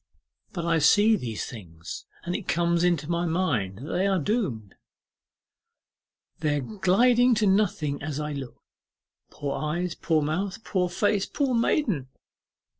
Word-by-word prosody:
But 170 -3 -4
I 165 -1 +2
see 205 +9 +5
these 120 - -4
things, 85 -9 -9 0.2
and 175 +1 -3
it 205 -2 -5
comes 170 0 +1
into 170 -5 +1
my 170 +1 0
mind 125 - 0
that 140 +8 -7
they 190 +2 +1
are 195 -1 +2
doomed, 140 - -2 1.7
they 150 -2 +1
are - - -1
gliding 235 - +3
to 215 -1 +2
nothing 190 -8 +1
as 145 0 -4
I 150 0 -3
look. 135 -4 -8 0.7
Poor 140 -1 -4
eyes, 170 +3 -2
poor 160 -2 0
mouth, 190 +8 -2
poor 180 -3 0
face, 200 +2 +1
poor 275 -3 -1
maiden! 230 - +1
170 Hz, 145 wpm, -26 LUFS, 145-200 Hz, 1.7 s, see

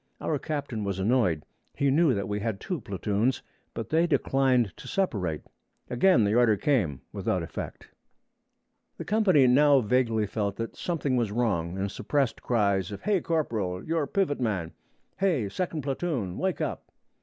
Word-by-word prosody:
Our 150 -3 -1
captain 140 -7 -3
was 100 -2 -2
annoyed; 95 - +1 0.3
he 140 -1 +2
knew 150 -3 +4
that 100 - -2
he 105 +1 -2
had 105 -2 -2
two 180 -7 -4
platoons, 105 +5 -1 0.3
but 115 - -5
they 165 +2 +3
declined 130 - +2
to - - -11
separate. 95 - -1 0.5
Again 145 - +4
the 100 0 +2
order 115 -3 +4
came, 95 - 0
without - - -1
effect. - - -7 1.1
The - - -6
company 190 -9 +4
now 140 +2 +5
vaguely 115 -1 +1
felt 100 -1 -2
that 115 0 -5
something 145 -7 -1
was 115 -4 0
wrong, 95 -7 -1
and 95 +1 -2
suppressed 140 -5 -1
cries 100 -5 +1
of 100 - -7
'Hay, 205 -4 +2
corporal! 110 - -2
you're 160 -3 0
pivot 185 -3 0
man!' 95 -8 -1 0.4
'Hay, 170 - +1
second 160 - -3
platoon! 135 - -2
wake 190 -1 -1
up!' - - -4
120 Hz, 155 wpm, -27 LUFS, 100-150 Hz, 1.1 s, now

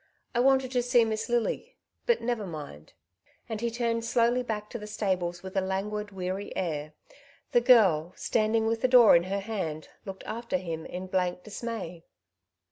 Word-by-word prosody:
I 240 - +1
wanted 265 0 +3
to 250 -2 +2
see 245 -1 +4
Miss 220 +1 -2
Lily, 240 -1 -1 0.3
but 475 - +3
never 230 -4 -2
mind;'' 145 - -9 0.5
and 220 -2 -4
he 235 - 0
turned 230 0 -1
slowly 235 +1 +2
back 215 -3 -4
to 235 - -5
the 210 - -8
stables 185 -4 -2
with 190 0 -8
a 195 - +3
languid, 205 +2 -2
weary 190 +1 -4
air. 155 -4 -3 0.6
The 240 - +4
girl, 195 -10 +5
standing 220 0 +1
with 225 0 0
the 255 - +4
door 245 -5 +8
in 170 +1 +3
her 195 +1 -2
hand, 185 -8 -4
looked 195 -1 -8
after 230 -3 -2
him 165 -3 -5
in 180 +1 -6
blank 180 -1 -1
dismay. 210 -6 -6
210 Hz, 175 wpm, -28 LUFS, 185-235 Hz, 0.6 s, door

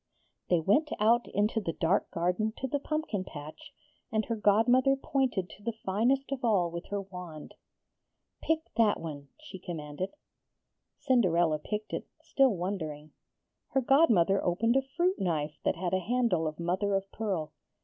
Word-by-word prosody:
They 175 - +4
went 210 - +2
out 230 +3 +3
into 210 +2 0
the 165 -5 -3
dark 170 +6 +1
garden 180 +6 0
to 265 - -3
the 285 +2 -1
pumpkin 305 -9 -2
patch, 155 -4 -10 0.4
and 220 -1 0
her 230 - -2
godmother 240 +6 +4
pointed 265 -8 -1
to - - -14
the 230 0 -3
finest 245 +9 +1
of 270 -2 -3
all 195 -7 +2
with 170 +1 -6
her 205 - -2
wand. 180 -5 -9 0.9
'Pick 320 0 -1
that 225 -3 +4
one,' 145 -3 -7
she 300 -11 -10
commanded. 170 - -5 0.8
Cinderella 175 -10 +2
picked 210 +6 -5
it, - - -3
still 265 -8 +2
wondering. 155 -5 -4 0.6
Her 270 - +3
godmother 230 - +4
opened 220 +7 +1
a 270 - +4
fruit 345 +8 -1
knife 155 -5 -1
that - - +1
had 175 +1 -3
a 185 - +3
handle 210 -5 +1
of 155 +1 -5
mother 190 +4 0
of 195 0 -2
pearl. 195 -8 -3
200 Hz, 160 wpm, -30 LUFS, 170-245 Hz, 0.9 s, They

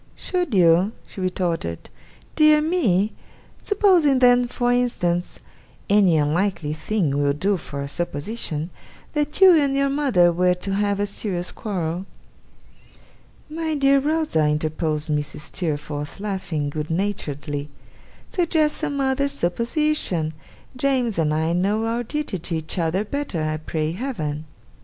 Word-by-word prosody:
'Should 355 - -2
you?' 180 +3 +4
she 190 - -8
retorted. 175 - -2 0.4
'Dear 305 -1 +6
me! 240 - +1 0.5
Supposing 370 -9 +3
then, 245 -1 +5
for 245 0 0
instance 180 -8 0 0.5
any 195 -5 +5
unlikely 155 +1 0
thing 175 0 -1
will 145 0 +2
do 195 +8 +1
for 140 -5 -6
a - - -5
supposition 165 +1 -3 0.4
that 295 +1 -1
you 380 -1 +9
and 285 -4 +3
your 275 0 +2
mother 255 -12 +3
were 180 +1 +2
to 195 +2 -4
have 200 0 0
a 205 - +1
serious 190 -3 -4
quarrel.' 180 -3 -3 1.4
'My 315 0 -3
dear 275 -1 +4
Rosa,' 295 - +1
interposed 155 0 -1
Mrs. 150 0 -2
Steerforth, 150 -1 -4
laughing 185 -8 -3
good 150 0 -4
naturedly, 150 -6 -3 0.6
'suggest 320 -4 +1
some 285 -3 -2
other 270 +1 +1
supposition! 235 - 0 0.4
James 250 -6 0
and 155 -2 +2
I 160 +2 0
know 205 +5 +1
our 230 +1 -1
duty 265 - -3
to 165 +1 -3
each 160 +3 -3
other 170 +5 0
better, 240 - -3
I 155 0 -1
pray 155 0 -2
Heaven! 165 - -4
195 Hz, 135 wpm, -23 LUFS, -, 1.4 s, you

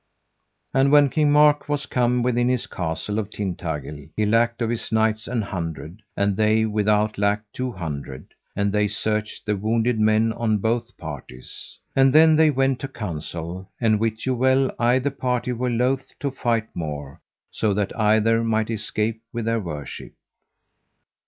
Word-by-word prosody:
And 135 +1 +3
when 145 -1 +6
King 150 -2 +2
Mark 150 0 +4
was 145 -1 -1
come 125 0 +1
within 120 0 +1
the 125 0 +2
Castle 90 +5 -3
of 105 -2 -4
Tintagil 80 -8 -5
he 110 - +1
lacked 115 +2 +2
of 115 - 0
his 120 - -3
knights 110 0 +1
an 120 -2 -1
hundred, 85 0 -6 0.2
and 100 0 +1
they 110 +1 +3
without 105 0 +1
lacked 105 +1 0
two 125 0 -3
hundred; 70 -7 -7 0.2
and 100 0 0
they 105 0 +2
searched 105 +1 -2
the 105 - 0
wounded 115 +3 0
men 110 +1 +3
on 110 -2 0
both 115 +2 -2
parties. 70 -5 -9 0.2
And 135 0 +5
then 160 +1 +7
they 160 0 +5
went 135 -2 +1
to 135 - -4
council; 85 - -6
and 110 -3 +2
wit 110 0 -2
you 130 - +1
well 130 +1 +2
either 125 +4 +2
party 125 -2 -1
were 125 +1 -1
loath 125 +3 -1
to 140 -1 -1
fight 115 -4 -1
more, 75 -4 -6 0.3
so 110 - 0
that 105 -1 -1
either 110 +1 +3
might 110 0 0
escape 110 +1 -2
with 120 -2 -4
their 115 0 +1
worship. 75 -8 -7
110 Hz, 165 wpm, -23 LUFS, 100-125 Hz, 0.3 s, then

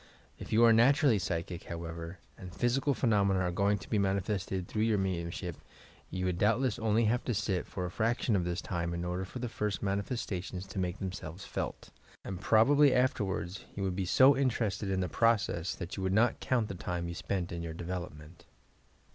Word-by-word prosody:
If - - -8
you 115 +2 +5
are 115 - +7
naturally 125 0 +5
psychic, 85 0 -3
however, 85 +1 -6 0.2
and 90 -2 -9
physical 130 - +1
phenomena 100 -6 +2
are 90 -1 0
going 100 +3 +2
to 100 - -11
be 105 - +1
mani 100 0 +2
fested 95 -2 -3
through 105 - -3
your 110 -1 +3
mediuraship, 90 -2 -3 0.5
you 95 +1 -3
would 90 -1 -1
doubtless 115 +3 +2
only 110 0 +2
have 120 +3 +1
to 120 - -1
sit 95 -3 -1
for 90 - -4
a 90 - -4
fraction 115 +2 +1
of 90 - +1
this 90 +2 -3
time 85 -2 -2
in 85 +1 -3
order 90 +2 -2
for 95 - -8
the 125 0 -3
first 105 -3 -3
manifestations 100 -2 -3
to 95 0 -6
make 90 0 -1
themselves 90 -2 -6
felt, - - -5 0.3
and 95 -1 -5
probably 135 +7 +5
afterwards 100 -7 0
you 100 - -3
would 95 -2 -1
be 95 0 -1
so 130 +9 +6
interested 110 -7 0
in 95 -1 0
the 90 - 0
process 105 -5 +1
that 85 - -6
you - - -3
would 95 0 0
not 115 +4 +3
count 120 -4 0
the 100 - -5
time 85 -1 -3
you 85 - -4
spent 90 0 -3
in 85 - -4
your 85 -1 -5
development. 85 -2 -7
95 Hz, 200 wpm, -31 LUFS, 90-110 Hz, 0.5 s, are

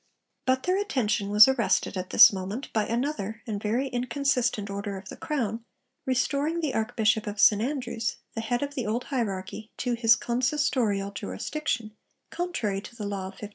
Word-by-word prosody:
But 260 0 +2
their 370 +2 +1
attention 215 - 0
was 210 +3 +8
arrested 245 -5 +1
at 185 0 -4
this - - +8
moment 195 +7 -5
by 215 -2 +1
another 230 -3 -2
and 210 -4 -4
very 235 +6 0
inconsistent 245 -3 0
order 200 0 -4
of 190 0 -10
the - - -7
Crown 230 -7 -3 0.4
restoring 280 +5 0
the 305 -5 -1
Archbishop 220 -1 +1
of 205 0 -5
St 210 0 +6
Andrews, 245 -3 -2 0.2
the 225 - -3
head 240 +3 -1
of 285 0 -4
the 255 -6 -3
old 235 +4 -1
hierarchy, 215 -4 -4
to 245 -1 -1
his 230 -1 +5
consistorial 240 -5 0
jurisdiction, 230 0 -3 0.4
contrary 235 - -2
to 235 - -12
the 215 -3 -5
law 200 -2 -3
of 190 - -9
1560. 210 - -7
230 Hz, 175 wpm, -27 LUFS, 205-260 Hz, 0.4 s, was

